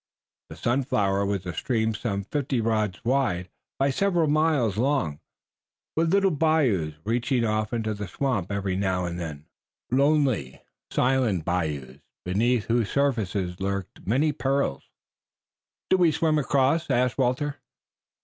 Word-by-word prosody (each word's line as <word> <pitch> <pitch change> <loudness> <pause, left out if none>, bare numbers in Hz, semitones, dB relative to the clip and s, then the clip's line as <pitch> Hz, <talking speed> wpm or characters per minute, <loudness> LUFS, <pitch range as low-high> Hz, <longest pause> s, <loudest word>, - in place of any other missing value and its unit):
The - - -9
Sunflower 100 -6 +1
was 100 -2 -2
a 90 - -4
stream 110 +5 0
some 100 -3 -3
fifteen 130 +1 -1
rods 110 -3 -1
wide 120 -9 +1 0.3
by 135 +1 +2
several 175 +1 +2
miles 150 -8 +2
long, 120 - 0 0.8
with 165 +1 +2
little 195 0 +4
bayous 140 - +1
reaching 120 +3 0
off 110 -1 0
into 110 -2 -1
the 105 -1 -5
swamp 105 -3 -2
every 100 -2 -1
now 95 -2 0
and 85 0 -4
then, 75 -3 -6 0.5
lonely, 135 - +2 0.3
silent 125 -10 +1
bayous, 75 -7 -2 0.3
beneath 110 +5 +1
whose 115 -2 +1
surfaces 100 -10 0
lurked 100 -1 -4
many 145 +8 +2
perils. 135 - -1 1.0
"Do 190 - +6
we 175 -3 +4
swim 155 0 +1
across?" 145 +3 +1
asked 125 0 +1
Walter. 135 +3 0
115 Hz, 130 wpm, -26 LUFS, 95-140 Hz, 1.0 s, Do